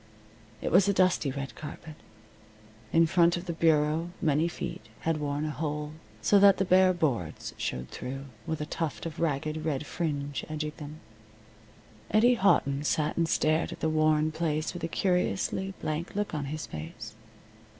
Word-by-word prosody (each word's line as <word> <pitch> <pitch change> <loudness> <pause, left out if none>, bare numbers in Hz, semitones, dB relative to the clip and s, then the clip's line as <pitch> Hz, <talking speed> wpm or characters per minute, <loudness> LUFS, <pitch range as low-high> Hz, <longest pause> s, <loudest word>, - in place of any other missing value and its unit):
It - - -1
was 190 +3 +6
a 200 - +3
dusty 185 -6 +3
red 135 +1 -5
carpet. 155 +1 -9 1.0
In 165 0 +5
front 170 0 +3
of 175 - -6
the 170 - -3
bureau 160 0 +2
many 155 +1 +2
feet 170 - -6
had 165 -1 0
worn 145 0 -2
a 155 - -2
hole, 150 0 -3 0.3
so 205 - +5
that 200 -1 +7
the 195 - +1
bare 185 0 +5
boards 135 - -2
showed 65 0 -3
through, 135 +2 -6 0.2
with 160 - -2
a - - -1
tuft 160 0 -3
of 165 - -6
ragged 155 0 -1
red 150 -2 -1
fringe 145 -4 -3
edging 155 0 -3
them. 150 +1 -9 1.1
Eddie 235 +4 +5
Houghton 150 - +2
sat 150 0 0
and 165 -1 +1
stared 155 +2 +2
at - - -8
the 160 - 0
worn 155 0 +3
place 155 -1 -1
with 175 - -7
a - - +1
curiously 190 +2 0
blank 155 +5 -3
look 205 -2 -2
on 150 -2 -2
his 155 +3 -4
face. 80 +8 -8
155 Hz, 170 wpm, -29 LUFS, 150-170 Hz, 1.1 s, that